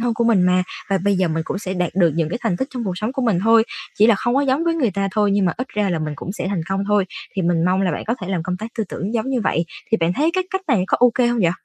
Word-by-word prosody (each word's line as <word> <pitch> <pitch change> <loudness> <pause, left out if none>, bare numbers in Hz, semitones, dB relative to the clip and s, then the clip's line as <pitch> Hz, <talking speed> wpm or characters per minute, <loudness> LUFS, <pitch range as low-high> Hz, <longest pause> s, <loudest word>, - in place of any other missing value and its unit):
thân 235 -1 0
của 235 - 0
mình 220 -6 +4
mà, 180 0 +3 0.3
và 195 - +2
bây 200 +2 +1
giờ 185 -2 +1
mình 160 0 -1
cũng 190 - -3
sẽ 190 -2 -4
đạt 180 -1 -2
được 175 -4 +3
những 165 -2 0
cái 235 - -3
thành 205 -7 0
tích 265 - -2
trong 245 - -3
cuộc 190 - -1
sống 215 +5 -2
của 265 -1 -2
mình 215 -7 +2
thôi, 225 0 +5 0.3
chỉ 215 - +6
là 230 - +6
không 240 +5 -1
có 275 - +3
giống 280 +3 +1
với 335 -1 +1
người 260 -9 +1
ta 195 +1 -1
thôi, 210 -1 +2
nhưng 200 -1 +2
mà 175 - +2
ít 255 +1 -4
ra 205 -2 -1
là 170 - 0
mình 155 -1 -3
cũng 185 - -6
sẽ 200 - -4
thành 190 -4 -1
công 195 0 -1
thôi." 205 -2 +3 0.3
Thì 190 - 0
mình 170 -1 +1
mong 185 +2 +2
là 185 - +1
bạn - - -4
có 230 - +1
thể 185 - -5
làm 180 -4 -1
công 180 +2 -3
tác 220 - -6
tư 220 - +1
tưởng 205 +6 -4
giống 230 +3 -1
như 255 - 0
vậy, 170 -4 0 0.3
thì 225 - +4
bạn 165 -3 +1
thấy 305 - +1
cái 370 0 0
cách 380 0 -2
này 220 -9 +3
có - - +2
ô 245 -1 +6
kê 250 -2 +3
hông 240 0 +1
vậy? 170 - +4
200 Hz, 350 wpm, -20 LUFS, 180-235 Hz, 0.3 s, chỉ